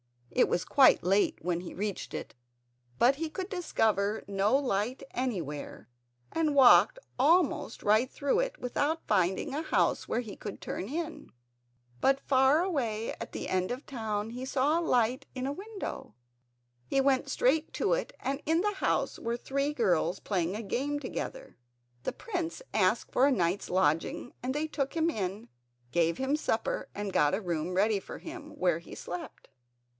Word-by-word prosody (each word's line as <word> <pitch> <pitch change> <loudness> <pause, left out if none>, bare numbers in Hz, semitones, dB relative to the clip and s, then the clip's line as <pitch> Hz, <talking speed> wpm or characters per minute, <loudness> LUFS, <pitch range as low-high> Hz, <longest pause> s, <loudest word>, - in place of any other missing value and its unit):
It - - +3
was 180 - 0
quite 270 -3 +5
late 195 +3 +2
when 175 0 -1
he 180 - -8
reached 200 0 -4
it, - - -6 0.6
but 260 +3 +4
he 325 +1 -2
could 375 +4 -5
discover 220 - 0
no 200 +4 +2
light 250 -2 -1
anywhere, 175 - -4 0.4
and 310 -3 +1
walked 270 - +7 0.2
almost 315 -3 +2
right 215 +5 +4
through 285 - 0
it - - -1
without 290 +6 -1
finding 190 - +1
a 300 - -1
house 320 - +1
where 240 - 0
he 215 -4 -8
could 205 - -7
turn 190 - -4
in. 320 +5 -5 0.7
But 270 0 +3
far 270 +4 +4
away 235 - -1
at - - -6
the - - -4
end 185 0 0
of 250 - -2
the - - -27
town 220 -3 -2
he 250 +2 -6
saw 280 +4 +2
a - - -1
light 250 -5 +1
in 255 0 -3
a 275 - -1
window. 390 - -6 0.7
He 275 - +1
went 270 0 +2
straight 300 +4 +2
to - - +1
it - - -2
and 275 +2 -2
in 325 +3 +2
the 415 +1 0
house - - 0
were 235 +1 -2
three 275 +4 -1
girls 180 - +1
playing 185 -2 -1
a 220 - -4
game 280 +8 -1
together. - - -6 0.5
The - - -2
prince 355 0 -4
asked - - +2
for 265 - +4
a - - +3
night's 185 -5 0
lodging 175 +6 0
and 260 +2 -2
they 300 +1 0
took 275 -2 -3
him 330 0 +2
in, 200 - -4 0.4
gave 165 -1 +2
him 265 +1 -1
some - - -1
supper 225 -7 -1
and 205 -2 -4
got 150 +5 +3
a 205 - -3
room 175 -1 -2
ready 205 +2 +3
for - - -9
him, 305 -3 -9
where 175 - +2
he 170 - -11
slept. 175 0 -7
250 Hz, 175 wpm, -30 LUFS, 200-295 Hz, 0.7 s, walked